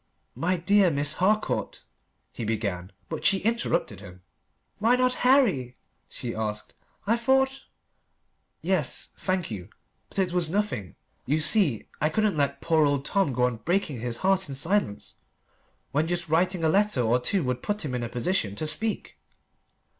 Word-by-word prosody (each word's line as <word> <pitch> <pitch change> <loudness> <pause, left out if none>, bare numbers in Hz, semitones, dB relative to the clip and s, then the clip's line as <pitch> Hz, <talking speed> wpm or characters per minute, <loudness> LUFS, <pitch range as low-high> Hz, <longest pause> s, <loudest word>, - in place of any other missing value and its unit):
"My 180 +2 0
dear 195 +2 +4
Miss 145 -1 +1
Harcourt," 210 +5 0 0.5
he - - -6
began. 100 -5 -3 0.2
But - - -5
she 195 - +4
interrupted 225 - -1
him. 90 -2 -13 0.6
"Why 230 +4 +4
not 255 0 +2
Harry?" 205 - +3 0.3
she 120 -2 -5
asked. 105 -1 -4 0.3
"I 220 +3 +3
thought 265 +3 +1 0.5
" - - -48
"Yes. 160 -8 0
Thank 185 -7 -1
you. 95 -2 -7 0.4
But - - -8
it 185 -2 +1
was 175 -3 +1
nothing. 195 - -2 0.3
You 150 +4 +2
see 155 - +3
I 150 - +3
couldn't 215 +3 +1
let 145 -2 -1
poor 160 -2 +3
old 140 -1 -1
Tom 195 -8 +1
go 125 0 0
on 125 -2 +1
breaking 165 - -1
his 120 -1 -3
heart 190 -3 +2
in 135 - -2
silence, 165 - -1 0.8
when 150 +3 +1
just 175 0 -2
writing 175 +2 +1
a - - +4
letter 200 -5 +2
or 120 +1 +2
two 180 +8 0
would 125 -1 -2
put 205 -4 -2
him 135 - -4
in 125 - -2
a 120 - -4
position 120 - -1
to 155 - -3
speak." 205 +9 0
160 Hz, 165 wpm, -26 LUFS, 125-200 Hz, 0.8 s, dear